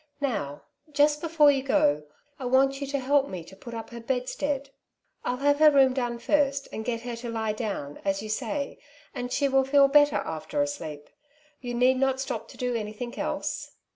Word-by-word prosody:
" - - -44
Now, 215 - -2 0.3
just 295 +1 +3
before 310 -3 +5
you 270 -1 0
go, 150 - +2 0.3
I 260 - -5
want 270 +2 +3
you 280 - -3
to 280 +1 -1
help 280 +1 +2
me 180 -3 -6
to 180 +3 -14
put 235 +4 -9
up 225 +1 -7
her 235 - -7
bedstead. 270 +3 -2 0.3
" - - -47
I'll 250 - -1
have 285 +2 +2
her 310 0 +8
room 270 -3 +5
done 245 -2 -2
first, 275 +2 +1
and 220 - -4
get 230 -1 -2
her 240 0 -5
to 235 0 -6
lie 220 -2 -1
down, 195 -10 -4
as 195 +1 -1
you 215 - -4 0.2
bay, 280 +4 -3 0.3
and 245 0 -4
she 280 +2 +2
will 270 0 +3
feel 275 +1 +5
better 290 +1 +5
after 160 - -3
a 290 - +4
sleep. 155 - -7 0.5
You 245 -1 -5
need 255 +2 +4
not 265 0 +1
stop 270 - -4
to - - -14
do 250 -1 -1
anything 225 +2 -5
else." - - -3
260 Hz, 210 wpm, -27 LUFS, 230-280 Hz, 0.5 s, her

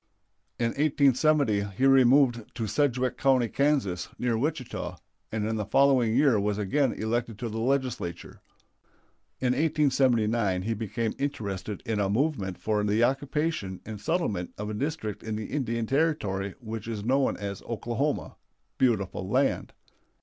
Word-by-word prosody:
In 115 -1 +1
1870 140 -4 +3 0.2
he 135 - +2
removed 130 -3 +5
to 115 -2 -2
Sedgwick 130 +3 0
County, 130 -3 +3
Kansas, 135 -9 0
near 120 -2 0
Wichita, 135 +1 -3 0.3
and 110 -1 -1
in 110 0 -1
the 105 - -1
following 125 -1 +3
year 135 -5 +4
was 105 0 0
again 125 +6 +1
elected 115 0 -2
to 115 +1 -4
the 110 +1 -4
Legislature. 125 -8 -2 1.0
In 125 -1 +2
1879 125 - +2
he 115 +3 -1
became 110 +1 -2
interested 105 -8 -4
in 110 -2 -1
a 100 -1 +1
movement 105 - 0
for 105 -1 0
the 105 +3 +2
occupation 135 - -1
and 105 -2 -7
settlement 105 - -1
of 105 +1 -4
a - - -4
district 135 -2 -3
in 110 -1 -4
the 110 0 -5
Indian 115 -5 -1
Territory 105 - 0
which 115 -2 -6
is 110 -3 -4
known 135 +2 +2
as 100 -1 -5
Oklahoma 120 +5 -2 0.4
(beautiful 100 -6 0
land). 135 +5 +1
115 Hz, 140 wpm, -27 LUFS, 105-135 Hz, 1.0 s, removed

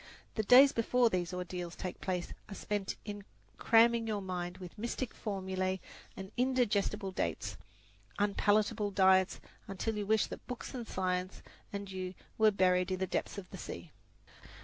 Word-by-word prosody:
The 220 - 0
days 255 +6 +8
before 235 +1 +3
these 180 -1 -1
ordeals 180 -1 -5
take 185 - -6
place 180 -2 -2 0.2
are 200 - -6
spent 205 -1 -2
in 205 -1 -6 0.4
cramming 230 0 +5
your 215 -2 -1
mind 180 -2 -4
with 180 -2 -9
mystic 235 +2 -3
formula 190 -2 -2 0.4
and 190 +1 -7
indigestible 215 -6 +1
dates - - -2 0.6
unpalatable 205 +1 +2
diets, 190 -1 +4 0.3
until 210 +3 -2
you 205 - -3
wish 220 0 +4
that - - -9
books 250 +2 -6
and 240 -3 -5
science 185 0 -2 0.3
and 200 -1 -5
you 185 -1 -4 0.2
were 220 0 +7
buried 185 -2 +3
in 185 - 0
the 190 - 0
depths 185 - -2
of 195 -2 -6
the - - -8
sea. - - -7
200 Hz, 155 wpm, -33 LUFS, 185-220 Hz, 0.6 s, days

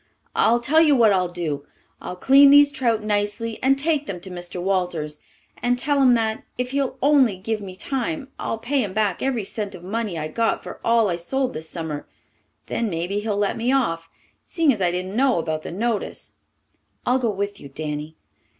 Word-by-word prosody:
I'll 235 +1 +4
tell 295 +7 +3
you 300 -3 +5
what 225 -5 +5
I'll 185 -1 +2
do. 160 -5 -4 0.3
I'll 180 - -6
clean 275 +8 +6
these 285 0 +7
trout 235 -6 0
nicely 210 +2 -1
and 270 +1 +3
take 295 0 0
them 180 -3 -4
to 190 - -8
Mr. 175 0 -6
Walters, 175 -5 -1 0.4
and 245 +2 +1
tell 285 +2 +1
him 250 -2 +6
that, 220 -1 -1
if 250 0 -2
he'll 275 -1 -1
only 270 -8 +4
give 215 +3 -3
me 190 -2 -8
time, 275 - -3
I'll - - -2
pay 260 +5 0
him 195 -3 -5
back 210 -4 0
every 255 -5 0
cent 200 0 -5
of 175 - -12
money 205 -1 -3
I 155 -1 -3
got 225 +8 0
for - - -8
all 230 -1 +3
I 175 -3 -1
sold 260 +9 -1
this 160 +1 -6
summer. 160 -3 -5 0.6
Then 230 - -2
maybe 175 +3 -2
he'll 210 -1 -2
let 205 -1 0
me 235 +3 0
off, 165 -11 0 0.3
seeing 325 -6 +2
as 210 - -6
I 180 - +3
didn't 185 +3 -3
know 260 -2 +3
about 160 -1 -2
the - - -7
notice." 220 +4 -3 0.7
"I'll 250 +2 +3
go 240 -3 0
with 200 0 -3
you, 140 - -10
Danny." 150 +2 -5
215 Hz, 200 wpm, -23 LUFS, 180-255 Hz, 0.7 s, these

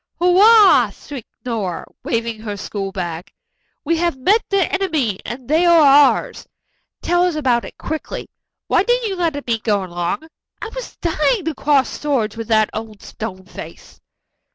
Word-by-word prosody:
"Hurrah!" 400 +4 +6
shrieked 275 -6 -10 0.2
Nora, 210 -8 -3 0.2
waving 230 -1 -2
her 210 -2 -6
school 195 -1 -5
bag. 175 0 -5 0.5
"'We 335 +3 +1
have 340 -3 0
met 400 - +3
the 395 -3 +2
enemy 315 - 0
and 245 0 -7
they 315 +4 +3
are 340 -1 +6
ours.' 290 - +4 0.6
Tell 350 0 +2
us 360 -3 +1
about 255 -6 +1
it - - -11
quickly. 315 -1 -5 0.4
Why - - +2
didn't 485 -2 +1
you 385 - -3
let 325 -5 -2
me 230 -2 0
go 205 -3 0
along? 175 - -4 0.3
I 440 - -6
was - - -7
dying 340 +4 0
to 325 - -1
cross 285 -2 +1
swords 250 -8 -1
with 225 -1 -6
that 215 -2 +2
old 220 -2 -7
stone 190 -4 -7
face." - - -11
275 Hz, 160 wpm, -19 LUFS, 215-345 Hz, 0.6 s, Hurrah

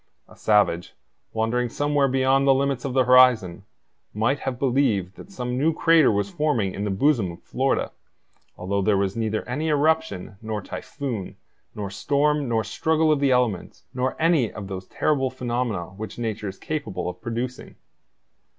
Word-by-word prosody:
A - - -17
savage, 105 -5 +1 0.4
wandering 120 +2 0
somewhere 145 +2 +1
beyond 135 +1 +2
the 135 - +6
limits 135 -1 -1
of 135 - -2
the 130 0 +4
horizon, 120 -7 +4 0.5
might 120 +7 +1
have 130 -2 -3
believed 120 -8 +1
that - - -12
some 125 -9 -4
new 160 +4 +2
crater 165 -6 +5
was 100 -1 0
forming 150 - 0
in 100 - -3
the - - -1
bosom 110 - +2
of - - -15
Florida, - - -1 0.7
although 100 +2 -1
there 100 +1 +2
was 100 0 0
neither 110 -1 -2
any 145 +6 -2
eruption, 150 - 0
nor 110 -1 -3
typhoon, 115 0 -6 0.4
nor 100 -2 -5
storm, 145 +4 +1
nor 115 -1 +1
struggle 160 +8 +1
of 150 - +2
the 140 -1 +2
elements, 125 -8 0
nor 130 +1 -2
any 160 -8 +2
of 105 -2 -8
those 95 -1 -6
terrible 135 -4 0
phenomena 120 -8 -3
which 105 +2 -8
nature 110 -3 -3
is 95 - -10
capable 110 -14 -4
of 90 0 -6
producing. 120 +2 -5
125 Hz, 165 wpm, -24 LUFS, 105-140 Hz, 0.7 s, the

